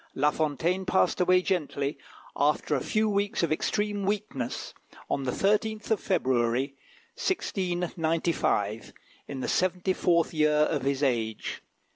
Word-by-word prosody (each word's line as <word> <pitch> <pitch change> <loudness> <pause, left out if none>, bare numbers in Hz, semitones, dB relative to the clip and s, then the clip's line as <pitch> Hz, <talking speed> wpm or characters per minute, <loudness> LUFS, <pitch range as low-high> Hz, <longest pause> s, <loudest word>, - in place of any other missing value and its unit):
La 145 +2 +3
Fontaine 160 +5 0
passed 190 0 +2
away 180 0 +4
gently, 145 -6 -1 0.4
after 150 +1 +1
a 135 - +1
few 215 +8 +1
weeks 200 -2 0
of 170 - +1
extreme 205 +5 0
weakness, 195 - -3 0.4
on 135 - 0
the 125 - 0
13th 215 - 0
of 220 - +3
February, 130 - +1 0.4
1695, 170 - -1 0.3
in 135 -2 -5
the - - -2
seventy 185 0 +1
fourth 170 -3 +2
year 155 -1 +3
of 150 -2 0
his 140 +1 0
age. 115 -5 -1
165 Hz, 130 wpm, -28 LUFS, 140-190 Hz, 0.4 s, away